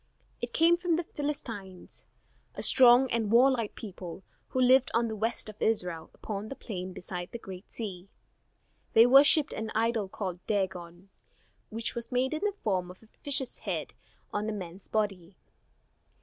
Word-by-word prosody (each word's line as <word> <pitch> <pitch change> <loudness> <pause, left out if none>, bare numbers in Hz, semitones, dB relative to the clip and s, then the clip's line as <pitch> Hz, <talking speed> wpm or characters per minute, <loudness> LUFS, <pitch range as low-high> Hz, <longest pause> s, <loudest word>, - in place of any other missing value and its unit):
It - - -4
came 335 +1 +4
from 350 -2 0
the 340 - -1
Philistines, 230 - -6 0.5
a - - -4
strong 250 0 +7
and 225 -3 0
warlike 240 -2 +3
people 190 -3 -8 0.2
who 255 - -3
lived 255 +1 +5
on 230 0 +2
the 220 - -4
west 220 +2 -2
of 215 -1 -10
Israel 180 -7 -1
upon 210 0 -6
the 275 - -6
plain 185 -7 -6
beside 180 0 -7
the - - -5
Great 190 -3 -11
Sea. 195 -4 -6 0.8
They 225 +1 +8
worshipped 275 +4 +6
an 220 0 -4
idol 225 -3 0
called 185 -3 -5
Dagon, 185 -3 -3 0.6
which 225 +1 -3
was 235 +1 -7
made 255 +3 +1
in 310 - -3
the 415 -2 0
form 185 -4 0
of 185 +4 -13
a - - -19
fish's 275 -3 +1
head - - -4 0.4
on 210 +1 -1
a - - -2
man's 185 -1 -8
body. 195 -4 -2
220 Hz, 165 wpm, -29 LUFS, 190-250 Hz, 0.8 s, They